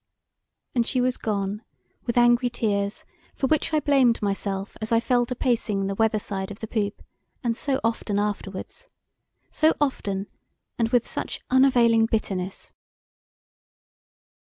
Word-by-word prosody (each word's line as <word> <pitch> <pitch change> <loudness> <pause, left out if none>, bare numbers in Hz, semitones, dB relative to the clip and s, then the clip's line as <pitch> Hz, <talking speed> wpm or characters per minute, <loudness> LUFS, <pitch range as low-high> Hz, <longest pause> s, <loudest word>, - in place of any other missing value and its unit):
And 240 - +3
she 255 - -1
was 250 0 +1
gone 205 -1 -2 0.5
with 235 - -1
angry 240 +1 +5
tears 205 -4 -1 0.3
for - - -1
which 310 +3 +1
I 310 - +3
blamed 270 -6 +3
myself 195 -1 -2
as 215 - -4
I 230 - +5
fell 245 0 +1
to 250 - -3
pacing 225 -6 0
the 195 - -1
weather 220 +1 +2
side 195 -2 -3
of 205 - -8
the - - -4
poop 210 -2 -2 0.4
and 235 -2 0
so 270 +2 0
often 225 -2 -1
afterwards! 205 - -4 0.6
So 315 +1 +3
often, 200 -9 -1 0.5
and 230 -1 +2
with 245 0 +2
such - - -4
unavailing 240 -4 +5
bitterness! 195 -4 -3
225 Hz, 140 wpm, -25 LUFS, 200-245 Hz, 0.6 s, angry